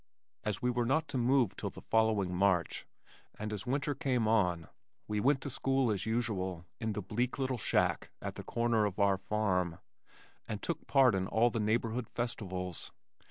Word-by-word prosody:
As 105 0 -2
we 125 - +3
were 120 -1 0
not 155 +5 +2
to - - -2
move 125 -3 +3
till - - -3
the - - -11
following 110 -5 +2
March, 90 -2 +1 0.5
and 105 0 -4
as 105 +2 -5
winter 140 +3 0
came 125 -4 0
on 90 -7 +2 0.4
we 105 0 -1
went 135 +4 +3
to 140 - -4
school 135 -2 +1
as 105 +1 -2
usual 95 -7 -1
in 110 -2 -1
the 105 - -4
bleak 120 +6 -1
little 130 -2 -1
shack - - +1
at - - -4
the - - -7
corner 115 -2 +1
of 100 -3 -2
our 100 -2 +3
farm 95 -4 0 0.7
and 110 -2 -3
took 170 - -3
part 135 -4 +5
in 95 -1 0
all 120 +4 +3
the 115 - -1
neighborhood 115 +2 0
festivals. 95 -7 -4
110 Hz, 180 wpm, -33 LUFS, 100-125 Hz, 0.7 s, part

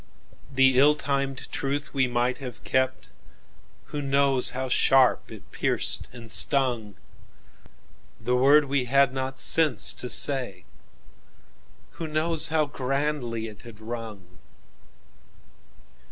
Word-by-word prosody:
"The 130 -1 +4
ill 150 +2 +5
timed 140 -2 -3
truth 145 +2 -4
we 135 -2 +1
might 125 +1 -1
have 125 -3 -9
kept—Who 130 +2 -6
knows 135 -2 +2
how 130 +1 -4
sharp 130 +1 +2
it - - -13
pierced - - -1
and 115 -2 -11
stung? 120 -6 +1 1.2
The 125 +2 -1
word 140 +4 +4
we 135 -2 -1
had 135 +1 +2
not 130 0 -4
sense 160 -2 +3
to 125 - -7
say—Who 130 - -5
knows 155 +1 +1
how 155 -1 +1
grandly 135 -4 -3
it 105 -2 -11
had 115 -3 -14
rung? 110 -5 -9
130 Hz, 110 wpm, -25 LUFS, 120-140 Hz, 1.2 s, ill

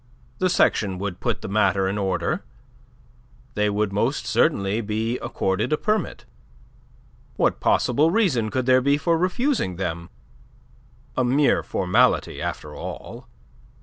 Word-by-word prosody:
The 185 - +2
section 100 - +2
would 95 -1 -4
put - - -2
the - - -6
matter 100 -1 +2
in 95 - -1
order. 95 -2 -1 1.1
They 105 0 +1
would 105 -1 -1
most 120 +5 0
certainly 110 -6 +1
be 110 +3 -2
accorded 95 +9 -1
a 155 - +2
permit. 215 +4 -2 1.1
What - - +1
possible 145 +6 +2
reason 165 - +1
could 130 +2 -1
there 130 0 +5
be 140 +2 +2
for 165 +3 +1
refusing 185 - 0
them? 85 -2 -4 1.1
A 130 - +1
mere 135 +3 +3
formality, 110 +7 +1
after - - -5
all! - - -8
115 Hz, 130 wpm, -23 LUFS, 100-145 Hz, 1.1 s, there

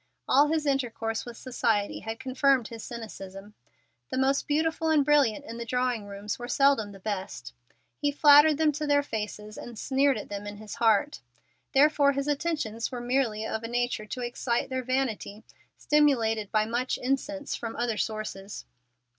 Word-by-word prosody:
All 285 +3 +5
his 310 0 0
intercourse 230 -5 -1
with 235 -1 -8
society 225 -5 -1
had 225 +1 -6
confirmed 260 -2 +2
his 230 -2 -8
cynicism. 205 -3 -8 0.6
The - - -3
most 270 +1 +1
beautiful 320 +2 0
and 300 -3 +4
brilliant 285 -3 +3
in 230 -2 -7
the - - -3
drawing 250 -2 -1
rooms 200 +2 -5
were 240 - -5
seldom 275 -6 +3
the 195 - -12
best. 185 - -5 0.5
He 290 -1 +1
flattered 295 +1 +7
them 310 -1 +3
to 300 +1 -4
their 285 0 +3
faces 210 -3 -5
and 240 -2 -9
sneered 270 +2 +2
at 210 - -7
them 205 0 -5
in 205 0 -7
his 215 -1 -9
heart. 230 +6 +2 0.5
Therefore 285 0 +5
his 275 +1 -2
attentions 290 -7 -2
were 250 - -4
merely 240 -3 0
of 220 - -3
a 230 - -5
nature 240 -2 -1
to 250 - -5
excite 240 0 -1
their 260 0 -1
vanity, 240 -5 -2 0.3
stimulated 230 -9 +2
by 215 0 +2
much 240 +3 -1
incense 285 +3 -2
from 230 -1 -5
other 235 -2 -1
sources. 210 -2 -4
245 Hz, 170 wpm, -28 LUFS, 215-280 Hz, 0.6 s, flattered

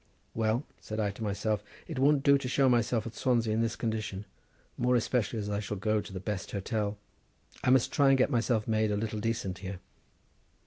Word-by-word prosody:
"Well," 110 +3 +1 0.2
said 110 0 -5
I 105 -2 +1
to 105 - -12
myself, 105 0 -1 0.3
"it 155 -6 -4
won't 140 +1 +4
do 140 -1 +5
to 130 - -4
show 135 +1 +3
myself 120 -2 +2
at 115 - -6
Swansea 115 -2 +1
in 110 - +1
this 115 -1 0
condition, 110 -3 -3 0.5
more 125 +1 +2
especially 120 -1 0
as 105 -1 -3
I 100 0 -1
shall 105 0 -4
go 105 +2 +1
to - - -10
the 95 - -5
best 100 +1 -4
hotel; 105 0 -2 0.7
I 130 - +2
must 130 -2 +4
try 140 -1 +4
and 135 - +5
get 130 - +2
myself 115 -3 +1
made 110 -1 +2
a 105 - 0
little 110 0 -2
decent 110 -4 -2
here." 95 -1 -6
110 Hz, 210 wpm, -30 LUFS, 105-125 Hz, 0.7 s, do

